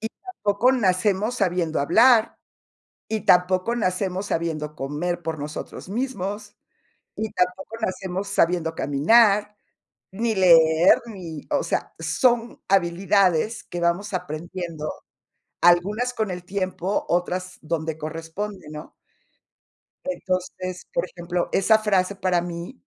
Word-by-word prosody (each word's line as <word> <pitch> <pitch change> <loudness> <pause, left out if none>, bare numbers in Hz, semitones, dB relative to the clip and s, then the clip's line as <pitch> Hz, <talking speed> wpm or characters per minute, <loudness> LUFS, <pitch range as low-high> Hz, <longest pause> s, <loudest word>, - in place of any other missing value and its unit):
Y 220 - -3 0.2
tampoco 210 - +2
nacemos 205 0 +1
sabiendo 175 -7 0
hablar, 230 - +4 0.7
y 220 -1 -1
tampoco 185 +5 +3
nacemos 190 -2 -1
sabiendo 155 -4 -2
comer 155 +5 -3
por 160 -1 -3
nosotros 150 +4 -7
mismos, 205 -3 -4 0.6
y 220 0 -3
tampoco 180 +4 -1
nacemos 190 -1 -3
sabiendo 170 -4 +1
caminar 205 - +3 0.6
ni 225 +4 -1
leer, 165 -2 +6
ni, 175 -9 -8
o 290 - +1
sea, - - -2
son 240 -2 +1
habilidades 190 +2 +2
que 175 - -6
vamos 175 +4 0
aprendiendo, 170 -2 -5 0.7
algunas 200 +8 +3
con 220 -5 -2
el 180 -1 -6
tiempo, 185 0 -2
otras 180 +1 -2
donde 160 0 -3
corresponde, 165 +5 -6
¿no? 150 0 -9 1.1
Entonces, 185 -7 -4
por - - 0
ejemplo, 175 0 -3
esa 220 +3 +4
frase 200 -3 +1
para 185 -2 +1
mí 170 - -7
185 Hz, 110 wpm, -24 LUFS, 170-205 Hz, 1.1 s, leer